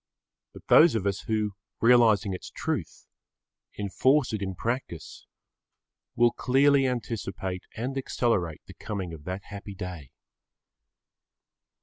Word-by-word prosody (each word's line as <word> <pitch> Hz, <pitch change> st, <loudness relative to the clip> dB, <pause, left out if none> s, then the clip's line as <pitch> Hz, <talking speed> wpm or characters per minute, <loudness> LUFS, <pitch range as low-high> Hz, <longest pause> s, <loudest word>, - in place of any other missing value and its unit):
But -, -, -13 dB
those 160 Hz, -5 st, +6 dB
of 105 Hz, -3 st, -1 dB
us 100 Hz, 0 st, 0 dB
who, 110 Hz, -2 st, 0 dB, 0.3 s
realising 115 Hz, -5 st, +4 dB
its 90 Hz, -, -7 dB
truth, 145 Hz, -, -4 dB, 0.7 s
enforce 130 Hz, +7 st, +2 dB
it 105 Hz, -, -2 dB
in 95 Hz, -1 st, -3 dB
practice 115 Hz, -6 st, -5 dB, 0.9 s
will 120 Hz, 0 st, +4 dB
clearly 135 Hz, +2 st, +3 dB
anticipate 100 Hz, -6 st, -4 dB
and 125 Hz, +4 st, -3 dB
accelerate 115 Hz, -, -1 dB
the -, -, -12 dB
coming 95 Hz, -5 st, -5 dB
of 75 Hz, -2 st, -11 dB
that 95 Hz, +2 st, -5 dB
happy 100 Hz, 0 st, -9 dB
day. 90 Hz, -8 st, -7 dB
105 Hz, 115 wpm, -27 LUFS, 95-125 Hz, 0.9 s, those